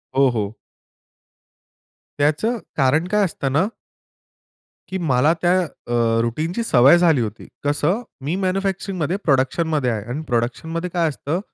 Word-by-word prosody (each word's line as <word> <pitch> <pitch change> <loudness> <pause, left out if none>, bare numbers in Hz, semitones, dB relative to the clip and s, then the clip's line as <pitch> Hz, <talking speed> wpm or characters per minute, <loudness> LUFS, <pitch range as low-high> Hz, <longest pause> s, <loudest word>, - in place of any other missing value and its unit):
हो, 135 -1 +5
हो. 110 -3 -2 1.7
त्याचं 155 +12 +1 0.2
कारण 150 +5 +2
काय 210 +1 +2
असत 160 -5 -5
ना 160 +9 +2 1.2
की 190 - -2
मला 150 -1 +2
त्या 175 0 +3
अ, 120 -6 -1
रूटीनची 155 - -2
सवय 140 - +6
झाली 165 -7 +3
होती. 110 0 -5 0.2
कसं? 150 +9 +1 0.2
मी 160 +5 -1
मॅन्युफॅक्चरिंगमध्ये 190 -2 -1
प्रोडक्शनमध्ये 145 0 +1
आहे 110 -3 -3
आणि 145 +6 -3
प्रोडक्शनमध्ये 160 +9 -2
काय 170 -2 +2
असतं, 150 +4 -3
155 Hz, 125 wpm, -21 LUFS, 130-175 Hz, 1.7 s, सवय